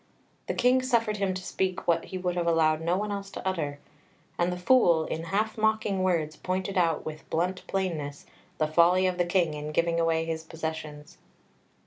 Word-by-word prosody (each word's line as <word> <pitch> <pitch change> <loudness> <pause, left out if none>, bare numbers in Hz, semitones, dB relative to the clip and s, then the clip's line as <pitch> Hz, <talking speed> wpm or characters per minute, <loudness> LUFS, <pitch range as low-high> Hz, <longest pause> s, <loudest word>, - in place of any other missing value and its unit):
The - - -2
King 255 +1 +4
suffered 235 -4 +1
him 195 -2 0
to 185 - -5
speak 185 0 -2
what 170 - +2
he 185 - -6
would 180 -1 -1
have 175 -1 -1
allowed 160 -1 +3
no 170 +2 +1
one 210 +1 -2
else 200 -1 -4
to 190 - -6
utter, 155 -6 -2 0.6
and 175 +1 +1
the 180 - -3
Fool, 180 -5 +4
in 160 +1 -4
half 215 +5 -1
mocking 220 -3 +1
words, 165 -5 0
pointed 185 +1 -3
out 165 -4 +1
with 155 0 -8
blunt 180 +3 -1
plainness 160 -7 -3 0.3
the 155 - +2
folly 170 +4 +4
of 180 -1 0
the 175 - +3
King 175 -3 +1
in 150 0 -5
giving 170 +1 +1
away 165 -1 +1
his 160 -1 -3
possessions. 160 -2 -6
175 Hz, 190 wpm, -28 LUFS, 160-190 Hz, 0.6 s, King